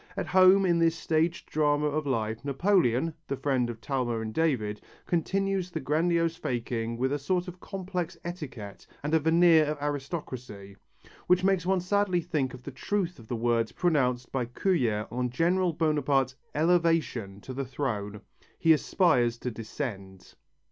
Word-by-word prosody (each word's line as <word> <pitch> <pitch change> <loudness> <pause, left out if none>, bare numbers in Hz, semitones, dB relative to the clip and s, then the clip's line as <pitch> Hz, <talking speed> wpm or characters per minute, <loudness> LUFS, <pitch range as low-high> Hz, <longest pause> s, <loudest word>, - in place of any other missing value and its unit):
At - - -1
home 185 +2 +6
in 170 -2 +3
this 165 0 +3
staged 165 +1 -1
drama 150 -1 +2
of 150 0 -1
life, 110 -3 -2
Napoleon, 155 - +2
the 140 - -2
friend 130 -4 0
of 115 -2 -6
Talma 120 -2 -1
and 110 -1 -5
David, 115 -10 0 0.2
continues 195 +2 0
the 165 - -4
grandiose 165 +3 +1
faking 115 -6 -3
with 130 +3 0
a 145 - -1
sort 180 +6 -1
of 180 0 -8
complex 185 -2 -4
etiquette 135 - -7 0.2
and 150 +2 -2
a 160 - +5
veneer 160 +1 +5
of 150 0 -2
aristocracy, 135 - -5 0.5
which 180 0 +4
makes 190 -2 +2
one 190 -1 +2
sadly 190 0 +1
think 155 -7 -2
of 125 - -14
the 140 - -7
truth 180 +5 -2
of 110 - -14
the 120 - -3
words 115 -1 +1
pronounced 125 -8 +1
by 130 -3 -1
Courier 120 - 0
on 125 +1 -1
General 175 +7 +1
Bonaparte's 145 -5 +1 0.2
elevation 160 - +1
to 130 - -8
the 135 +2 -3
throne: 105 -6 -4 0.4
He 165 - +5
aspires 135 -8 +2
to 125 - -4
descend. 105 -5 -7
145 Hz, 160 wpm, -28 LUFS, 120-175 Hz, 0.5 s, home